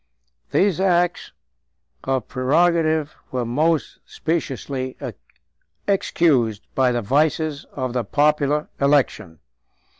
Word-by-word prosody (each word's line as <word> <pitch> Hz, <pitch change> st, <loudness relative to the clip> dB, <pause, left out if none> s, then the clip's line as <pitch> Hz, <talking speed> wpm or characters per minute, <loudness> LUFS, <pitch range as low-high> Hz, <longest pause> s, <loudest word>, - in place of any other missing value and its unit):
These 190 Hz, -4 st, +2 dB
acts 175 Hz, -2 st, +1 dB, 0.7 s
of 130 Hz, -3 st, -1 dB
prerogative 155 Hz, +2 st, +1 dB, 0.2 s
were 125 Hz, -2 st, -1 dB
most 155 Hz, +6 st, 0 dB
speciously 135 Hz, -4 st, -3 dB, 0.9 s
excused 135 Hz, -, +1 dB
by 130 Hz, -2 st, +3 dB
the 120 Hz, -1 st, -1 dB
vices 150 Hz, +4 st, +1 dB
of 130 Hz, -2 st, -3 dB
a 125 Hz, -, +1 dB
popular 150 Hz, +4 st, +1 dB
election. 140 Hz, -, +1 dB
145 Hz, 90 wpm, -22 LUFS, 130-160 Hz, 0.9 s, by